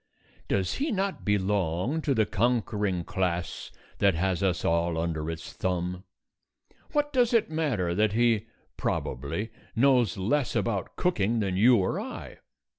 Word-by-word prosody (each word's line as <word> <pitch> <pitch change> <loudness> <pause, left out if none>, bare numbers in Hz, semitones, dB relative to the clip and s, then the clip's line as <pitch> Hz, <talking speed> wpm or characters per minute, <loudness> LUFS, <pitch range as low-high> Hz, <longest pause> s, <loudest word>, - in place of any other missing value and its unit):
Does 95 -2 0
he 290 +2 -1
not 195 -1 -1
belong 100 - 0
to 140 -3 +1
the 110 -2 +3
conquering 105 -5 0
class 90 -2 -2 0.3
that 100 -3 +4
has 95 +2 0
us 95 -2 0
all 85 0 +1
under 80 -1 -2
its 80 0 -6
thumb? 90 0 -2 0.9
What 295 0 0
does 245 -2 +3
it 220 -8 +2
matter 130 - 0
that 105 +2 +2
he 115 -1 +2 0.3
(probably) 70 - -2 0.2
knows 125 -5 +3
less 125 +8 0
about 100 -3 -1
cooking 115 - +1
than 95 -3 -1
you 120 +6 +6
or 95 -4 +1
I? - - -8
100 Hz, 140 wpm, -28 LUFS, 90-120 Hz, 0.9 s, you